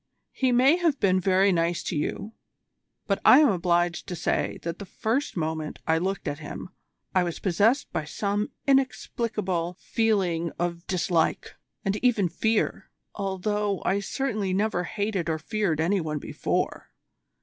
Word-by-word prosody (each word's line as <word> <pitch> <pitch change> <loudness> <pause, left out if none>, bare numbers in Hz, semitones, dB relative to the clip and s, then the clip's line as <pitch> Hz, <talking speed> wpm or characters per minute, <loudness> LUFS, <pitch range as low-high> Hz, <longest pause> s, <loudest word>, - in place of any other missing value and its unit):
He 260 -2 +1
may 260 +7 +5
have 330 -6 +1
been 185 -1 +3
very 190 +1 +3
nice 170 -1 0
to - - -3
you, 200 +8 -3 0.7
but 195 -2 0
I 255 - +9
am 295 - +6
obliged 175 -2 +1
to 180 - -4
say - - -1
that 170 -1 -4
the 200 - -6
first 230 +4 -2
moment 160 -1 -2
I 160 0 +2
looked 190 +2 -2
at 145 - -3
him 150 +4 -7 0.4
I 185 - +4
was 175 -2 -2
possessed 210 - +1
by 155 - -2
some 205 +6 -1 0.2
inexplicable 215 -9 0
feeling 185 -7 0
of 170 0 -3
dislike, 175 -3 0 0.3
and 195 +1 +1
even 225 -8 +2
fear, 220 +5 0 0.2
although 200 +1 -1
I 195 +2 +2
certainly 210 -3 -2
never 200 -3 0
hated 200 -5 -2
or 160 - 0
feared 190 -1 -1
any 180 +4 +2
one 155 -2 -3
before. - - -2
190 Hz, 150 wpm, -26 LUFS, 170-215 Hz, 0.7 s, I